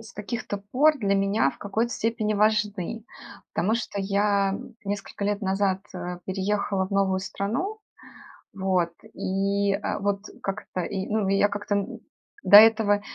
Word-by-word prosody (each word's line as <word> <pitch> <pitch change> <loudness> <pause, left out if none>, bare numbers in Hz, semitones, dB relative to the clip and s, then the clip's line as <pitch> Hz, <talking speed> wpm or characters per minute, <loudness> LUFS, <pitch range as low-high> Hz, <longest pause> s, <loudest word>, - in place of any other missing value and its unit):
с 220 -2 -12
каких-то 210 -1 -4
пор 275 +9 +2
для 200 -3 +1
меня 195 -5 +2
в - - -16
какой-то 220 +4 -1
степени 220 -1 -1
важны, 210 0 0 0.5
потому 215 +4 +1
что 225 -3 -3
я 200 0 +1 0.3
несколько 200 0 -4
лет 205 0 0
назад, 195 0 +1
э, 180 0 -5
переехала 195 0 -1
в - - -24
новую 195 -1 +1
страну, 250 - -3 0.7
вот, 185 -3 0 0.2
и, 200 +1 0
э, 200 +1 -2
вот 200 0 -1 0.2
как-то, 195 -2 -4
и, 190 +2 -3
ну, 210 -2 0
и 195 - +3
я 205 - +4
как-то, 205 0 -3
м, 200 -1 -3 0.4
до - - +6
этого 215 -1 +7
200 Hz, 150 wpm, -25 LUFS, 195-210 Hz, 0.7 s, этого